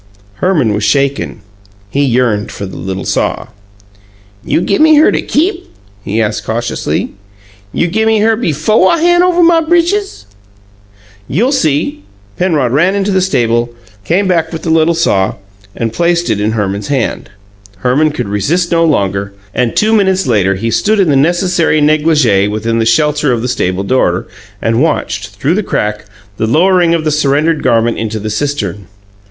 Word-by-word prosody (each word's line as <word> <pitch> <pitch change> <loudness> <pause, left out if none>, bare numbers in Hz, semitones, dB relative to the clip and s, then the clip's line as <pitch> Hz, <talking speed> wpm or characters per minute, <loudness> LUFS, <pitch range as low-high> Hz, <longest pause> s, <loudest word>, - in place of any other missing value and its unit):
Herman 155 - +1
was 105 0 -2
shaken; 140 0 0 0.5
he 140 +4 +1
yearned 120 -5 0
for 100 - -6
the 95 - -9
little 95 +1 -5
saw. - - -2 0.9
"You - - 0
gimme 310 - +3
her 300 - +5
to - - -1
keep?" 345 +4 -1 0.3
he 105 +3 -2
asked 105 -1 -1
cautiously. 115 +1 -3 0.6
"You - - 0
gimme 220 +5 +1
her 220 +1 +2
befo' 215 - +1
I 335 - +2
han' 350 +2 +3
over 355 -1 +3
my 335 -1 +4
britches?" 345 - 0 1.0
"You'll 230 - 0
see!" 150 - 0 0.3
Penrod 155 -9 0
ran 175 +9 +2
into 200 0 0
the 190 -1 +2
stable, 120 -8 0 0.3
came 185 - 0
back 165 -3 0
with 160 -2 -6
the 165 - -1
little 160 +1 +3
saw, 100 -12 +1 0.4
and 115 -1 -3
placed 170 -2 0
it 105 -1 -1
in 110 +1 0
Herman's 100 -2 -2
hand. 135 -7 -2 0.6
Herman 145 +5 +3
could 150 - -4
resist 150 - -1
no 165 -1 +3
longer, 100 - 0 0.2
and 125 -2 -1
two 215 +1 +2
minutes 190 -4 +2
later 100 -6 +1
he 115 +4 -3
stood 215 - +1
in 185 -5 +3
the 140 - +3
necessary 170 +2 +1
negligee 150 -9 +2
within 110 +2 -2
the 115 - +1
shelter 150 +3 +2
of 120 -2 -1
the - - -1
stable 95 -6 -1
door, 130 +6 0 0.4
and 115 +2 +1
watched, 105 -10 -1
through 100 +11 -2
the 210 - 0
crack, 105 - -3 0.3
the 110 - -1
lowering 175 +5 +3
of 165 - -2
the 155 - 0
surrendered 150 +2 +1
garment 115 -2 +1
into 110 -1 -3
the 110 0 -4
cistern. 105 -7 -3
145 Hz, 165 wpm, -12 LUFS, 110-180 Hz, 1.0 s, her